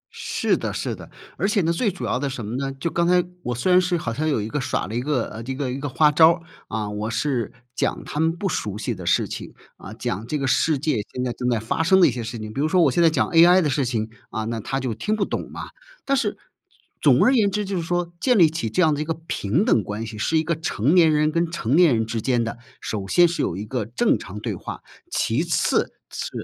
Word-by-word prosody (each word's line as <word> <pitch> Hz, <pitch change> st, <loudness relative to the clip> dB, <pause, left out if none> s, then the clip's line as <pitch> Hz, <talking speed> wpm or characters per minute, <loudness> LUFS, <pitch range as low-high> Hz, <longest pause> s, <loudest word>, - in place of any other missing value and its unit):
是 -, -, 0 dB
的 -, -, -3 dB
是 -, -, -3 dB
的， -, -, -12 dB, 0.3 s
而 195 Hz, -, +1 dB
且 205 Hz, -2 st, +2 dB
呢， 165 Hz, 0 st, +1 dB
最 205 Hz, +5 st, 0 dB
主 190 Hz, -, -6 dB
要 125 Hz, -, 0 dB
的 140 Hz, +1 st, -1 dB
什 130 Hz, -5 st, -5 dB
么 110 Hz, +4 st, -4 dB
呢？ 135 Hz, 0 st, -2 dB
就 170 Hz, +3 st, -2 dB
刚 170 Hz, 0 st, +1 dB
才， 180 Hz, 0 st, +4 dB, 0.2 s
我 125 Hz, -6 st, -3 dB
虽 150 Hz, +11 st, 0 dB
然 180 Hz, 0 st, +6 dB
是 180 Hz, -1 st, 0 dB
好 115 Hz, -8 st, -3 dB
像 155 Hz, +6 st, -1 dB
有 140 Hz, -, +1 dB
一 105 Hz, -, -3 dB
个 140 Hz, +5 st, -2 dB
耍 -, -, -1 dB
了 105 Hz, -, -7 dB
一 120 Hz, -, -1 dB
个 125 Hz, -5 st, -2 dB
这 130 Hz, +3 st, -4 dB
一 -, -, -6 dB
个 135 Hz, -2 st, -2 dB
一 130 Hz, -, -4 dB
个 145 Hz, +1 st, -3 dB
花 150 Hz, +4 st, +4 dB
招 160 Hz, +2 st, +7 dB
儿， 170 Hz, -, -9 dB, 0.3 s
啊， 110 Hz, -2 st, -3 dB
我 105 Hz, +1 st, -3 dB
是 120 Hz, -1 st, -1 dB, 0.2 s
讲 -, -, -1 dB
他 150 Hz, -, -5 dB
们 160 Hz, +1 st, +3 dB
不 175 Hz, +4 st, -3 dB
熟 105 Hz, -, -2 dB
悉 105 Hz, -, -2 dB
的 -, -, -8 dB
事 -, -, +2 dB
情， -, -, -7 dB, 0.2 s
啊， -, -, -10 dB
讲 110 Hz, +4 st, -4 dB
这 150 Hz, -, -1 dB
个 140 Hz, -, -2 dB
世 145 Hz, +4 st, +2 dB
界 150 Hz, -1 st, 0 dB
现 125 Hz, -, -3 dB
在 120 Hz, -, -2 dB
正 125 Hz, +1 st, -2 dB
在 115 Hz, -, +1 dB
发 115 Hz, +8 st, -2 dB
生 190 Hz, +4 st, +4 dB
的 180 Hz, -, +7 dB
一 -, -, +1 dB
些 120 Hz, -, -4 dB
事 115 Hz, +1 st, -5 dB
情， 110 Hz, 0 st, -7 dB
比 135 Hz, -, -2 dB
如 155 Hz, -, +2 dB
说 180 Hz, +2 st, +3 dB
我 -, -, +4 dB
现 175 Hz, -, +1 dB
在 165 Hz, -, +6 dB
讲 160 Hz, -, +1 dB
AI 175 Hz, +2 st, +7 dB
的 150 Hz, -, +1 dB
事 135 Hz, 0 st, +1 dB
情， 115 Hz, -3 st, -2 dB, 0.2 s
啊， 110 Hz, -, -3 dB
那 115 Hz, 0 st, -3 dB
他 135 Hz, +5 st, -3 dB
就 130 Hz, -3 st, -2 dB
听 165 Hz, -, -1 dB
不 205 Hz, -2 st, 0 dB
懂 -, -, -4 dB
嘛。 -, -, -7 dB, 0.4 s
但 275 Hz, -, +2 dB
是， 230 Hz, -6 st, -1 dB, 0.6 s
总 -, -, +5 dB
而 255 Hz, -, +5 dB
言 215 Hz, -6 st, +3 dB
之 210 Hz, +2 st, -2 dB
就 195 Hz, 0 st, -3 dB
是 -, -, -1 dB
说 175 Hz, +1 st, -2 dB
建 250 Hz, -4 st, +3 dB
立 170 Hz, -, +7 dB
起 160 Hz, -8 st, -3 dB
这 180 Hz, +12 st, +2 dB
样 155 Hz, -2 st, +4 dB
的 145 Hz, -, -2 dB
一 -, -, 0 dB
个 160 Hz, +1 st, -2 dB
平 150 Hz, -, 0 dB
等 115 Hz, -, +3 dB
关 105 Hz, +4 st, -5 dB
系， 110 Hz, -1 st, -8 dB
是 160 Hz, +9 st, +1 dB
一 155 Hz, -, +2 dB
个 165 Hz, +2 st, 0 dB
成 150 Hz, -3 st, 0 dB
年 165 Hz, -3 st, +6 dB
人 150 Hz, 0 st, +2 dB
跟 170 Hz, +1 st, 0 dB
成 140 Hz, -6 st, -1 dB
年 175 Hz, -2 st, +6 dB
人 110 Hz, 0 st, 0 dB
之 115 Hz, 0 st, -3 dB
间 120 Hz, 0 st, +1 dB
的 115 Hz, +1 st, -5 dB, 0.2 s
首 100 Hz, -3 st, -4 dB
先 175 Hz, -, +5 dB
是 170 Hz, -, -2 dB
有 85 Hz, -, -1 dB
一 100 Hz, -, -5 dB
个 110 Hz, -1 st, -3 dB
正 125 Hz, -, +1 dB
常 -, -, -8 dB
对 -, -, -3 dB
话， -, -, -7 dB, 0.3 s
其 125 Hz, -, 0 dB
次 170 Hz, -1 st, +1 dB, 0.2 s
是 -, -, -4 dB
145 Hz, 305 characters per minute, -23 LUFS, 115-170 Hz, 0.6 s, 招